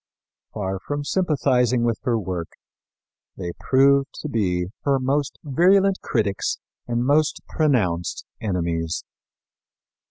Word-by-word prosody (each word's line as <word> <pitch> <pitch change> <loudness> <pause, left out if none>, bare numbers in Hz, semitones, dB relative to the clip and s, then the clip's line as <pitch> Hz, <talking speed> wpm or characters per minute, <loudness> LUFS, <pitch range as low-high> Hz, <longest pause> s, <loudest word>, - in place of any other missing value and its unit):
Far 95 -2 -2
from 145 +7 -4
sympathizing 130 -8 +2
with 115 -2 0
her 120 -2 +2
work, 90 -5 -4 0.8
they 90 -2 -4
proved 140 +1 +4
to 150 - -4
be 90 -8 0 0.2
her 140 -1 +3
most 135 +2 -1
virulent 190 +7 +4
critics 105 -6 0 0.3
and 120 0 0
most 150 +3 +2
pronounced 100 - 0 0.2
enemies. 85 -5 -1
125 Hz, 105 wpm, -23 LUFS, 95-145 Hz, 0.8 s, proved